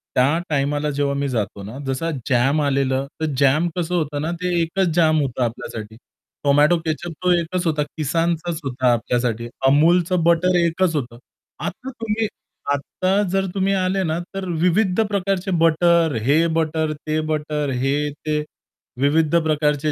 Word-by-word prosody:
त्या 140 +6 +3
टाईमाला 145 +1 0
जेव्हा 140 0 0
मी 140 0 -1
जातो 105 -4 -3
ना, 110 +7 -8
जसं 135 +5 -2 0.2
जाम 135 +5 +3
आलेलं 135 -1 0
तर - - +1
जॅम 145 +5 +3
कसं 175 +1 -1
होतं 150 -3 -1
ना 160 +2 -2
ते 180 -1 -1
एकच 180 +3 0
जॅम 155 -2 +4
होतं 130 -2 -1
आपल्यासाठी. 110 -2 -5 0.5
टोमॅटो 145 +4 +4
केचअप 160 +2 -3
तो 180 - +3
एकच 175 +2 -3
होता, 150 -2 +1 0.2
Kissanचाच 165 +2 -1
होता 130 -2 +1
आपल्यासाठी. 120 -1 -1 0.2
Amulच 170 +5 +4
बटर 170 +2 +3
एकच 170 0 +1
होतं. 120 -4 -3 0.4
आता 255 +8 -5
तुम्ही 225 -3 -2 0.5
आता 185 +8 0
जर 195 0 +1
तुम्ही 195 +1 +1
आले 190 0 0
ना 160 0 -1 0.2
तर 195 -1 -3 0.2
विविध 185 +3 +2
प्रकारचे 195 -1 -1
बटर, 165 -2 +3
हे 155 +6 +3
बटर, 160 -1 0
ते 155 +1 -3
बटर, 150 -1 -1
हे 145 +2 0
ते 150 +1 -3 0.6
विविध 155 +3 +2
प्रकारचे 150 -1 +1
155 Hz, 150 wpm, -21 LUFS, 140-175 Hz, 0.6 s, जॅम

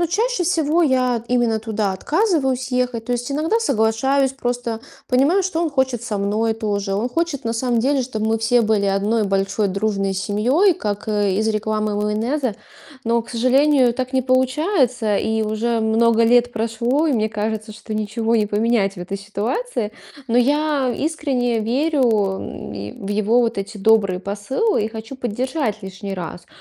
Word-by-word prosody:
Ну, 345 - +2
чаще 435 +3 0
всего 325 -1 +2
я 255 -4 +1
именно 240 -2 +1
туда 215 -2 -2
отказываюсь 270 - 0
ехать. 250 -2 -1
То 245 - -1
есть 245 +3 -2
иногда 320 +10 +1
соглашаюсь, 265 - +1
просто 245 -3 -3 0.3
понимаю, 280 +10 +3
что 360 -3 -1
он 335 -2 0
хочет 260 -4 0
со 215 -4 -2
мной 215 +3 0
тоже. 205 -3 -2
Он 215 +5 -1
хочет 330 +1 -2
на 230 - -1
самом 235 0 0
деле, 270 +2 +1
чтобы 220 -3 -3
мы 225 - +1
все 235 +2 +3
были 215 -2 +1
одной 205 +3 +1
большой 195 +1 0
дружной 195 0 -1
семьей, 225 - +2
как, 205 -5 -4
э, 205 -2 +1
из 215 +4 0
рекламы 215 -1 -1
майонеза. 225 +4 -1 0.5
Но, 235 0 +1
к - - -14
сожалению, 255 +2 +3
так 255 +2 -4
не 260 -1 +2
получается. 255 - +1
И 220 +1 0
уже 225 +2 -1
много 225 +1 +3
лет 245 +1 +4
прошло, 235 +7 0
и - - +2
мне 220 -3 +1
кажется, 215 0 -3
что 215 +1 -9
ничего 215 +2 0
не 215 -2 +2
поменять 210 -1 +1
в - - -12
этой 185 +3 -5
ситуации. 210 - -3 0.4
Но 235 +1 +3
я 285 -1 +1
искренне 270 -6 -1
верю, 270 +7 +1 0.4
м, 105 - -7
в - - -4
его 215 +3 +2
вот 230 -3 0
эти 195 +2 -5
добрые 195 -3 +3
посылы 210 - -1
и - - -2
хочу 225 +3 -8
поддержать 245 -1 -2
лишний 195 +1 -6
раз. 175 -1 -7
230 Hz, 170 wpm, -20 LUFS, 210-265 Hz, 0.5 s, лет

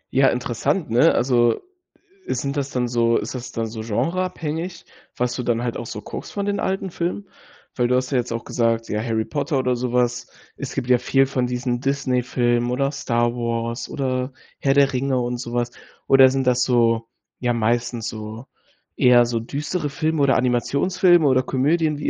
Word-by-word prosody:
Ja, 135 0 +5
interessant, 125 - -1
ne? 125 +8 +5
Also, 120 -2 +3 0.7
ist - - -2
sind 140 +1 -2
das 140 -1 -2
dann 125 -2 -1
so 115 -1 +2
ist - - -4
das 125 -1 -6
dann 115 - -2
so 110 0 -6
genre-abhängig, 165 - -2 0.3
was 125 0 0
du - - -2
dann 120 -1 0
halt 120 -1 -2
auch 120 - -5
so 105 - -6
guckst - - -7
von 200 -1 -2
den 205 0 -1
alten 190 0 -2
Filmen? 175 +4 -3 0.5
Weil 120 -1 +2
du 125 - +2
hast 130 +1 -1
ja 130 - +2
jetzt 120 -1 -3
auch 115 0 -3
gesagt, 115 -1 0
ja, 105 - -1
„Harry 110 -1 -1
Potter“ 145 0 -1
oder 125 -1 +1
sowas. 125 0 0 0.3
Es 140 - -6
gibt 130 -3 -2
ja 125 -1 +4
viel 135 +2 +3
von 130 -2 -1
diesen 125 0 -2
Disney-Filmen 125 -3 0
oder 135 +2 0
„Star 120 -4 0
Wars“ 115 0 -3
oder 130 -1 -2 0.3
„Herr 135 0 +2
der 140 -1 +4
Ringe“ 130 0 0
und 120 0 -2
sowas. 120 0 -2 0.3
Oder 135 -1 +7
sind 135 0 -1
das, 125 -1 +3
so 115 -2 +2 0.3
ja, 120 -1 0
meistens 115 0 0
so 110 +2 -7 0.5
eher 120 -1 +6
so 120 -1 -1
düstere 145 +7 -3
Filme 155 +1 -1
oder 140 -1 +4
Animationsfilme 155 +8 +3
oder 130 -1 +4
Komödien? 150 +4 +1
Wie 145 - -2
125 Hz, 185 wpm, -22 LUFS, 120-140 Hz, 0.7 s, Oder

